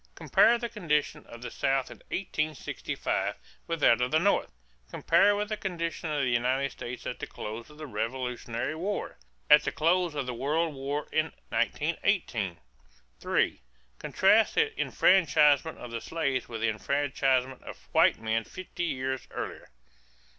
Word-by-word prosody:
Compare 235 - +4
the 235 - -3
condition 160 -10 -1
of 120 +1 -11
the 125 - -6
South 135 -1 0
in - - -11
1865 155 -6 -2 0.3
with 165 -2 -3
that 115 -2 +5
of 125 - +1
the 155 - +3
North. 195 +5 +2 0.4
Compare 205 0 +3
with 210 +1 -2
the 215 - -1
condition 170 -4 -3
of 145 -2 0
the 130 - +1
United 130 +3 +1
States 120 +1 -7
at - - -4
the - - -5
close 110 +4 -7
of 150 - -15
the 155 - -7
Revolutionary 120 +1 -3
War. 190 +6 -4 0.3
At 150 0 +8
the - - -1
close 170 0 +1
of 140 -2 -2
the 125 - -3
World 150 +6 0
War 140 +2 -3
in 155 0 +2 0.2
1918. - - 0 0.6
3. - - 0 0.4
Contrast 215 +3 +3
the 445 0 +1
enfranchisement 160 -4 +4
of 125 - -9
the 115 -1 -4
slaves 140 -6 -2
with 115 -2 -5
the 115 - +2
enfranchisement 135 +2 0
of - - -11
white - - +4
men 115 0 0
fifty 180 +2 -6
years 130 -4 -3
earlier. - - -6
145 Hz, 155 wpm, -28 LUFS, 125-170 Hz, 0.6 s, At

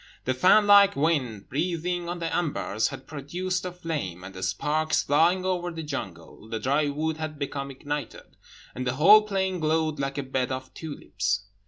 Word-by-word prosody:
The 130 - +1
fan 185 +10 +5
like 200 -1 +7
wind, 135 -9 0
breathing 175 +3 -2
on 175 - -3
the 165 -1 -3
embers, 140 - 0
had 130 - -8
produced 180 +6 -3
a 180 - -3
flame; 150 - -5
and 95 +1 -9
the 95 - -8
sparks, 155 +11 0
flying 170 +6 +3
over 180 -1 -1
the 165 -1 -6
jungle, 105 - -7
the 110 0 -3
dry 140 +6 +1
wood 155 +2 -2
had 155 -1 -5
become 140 -1 -4
ignited, 145 -1 -6 0.4
and 125 +1 -4
the 125 - 0
whole 200 +9 +8
plain 190 -3 -1
glowed 155 -1 0
like 135 0 -2
a 140 - -1
bed 130 -1 -2
of 130 0 -5
tulips. 100 - -3
150 Hz, 180 wpm, -26 LUFS, 130-175 Hz, 0.4 s, whole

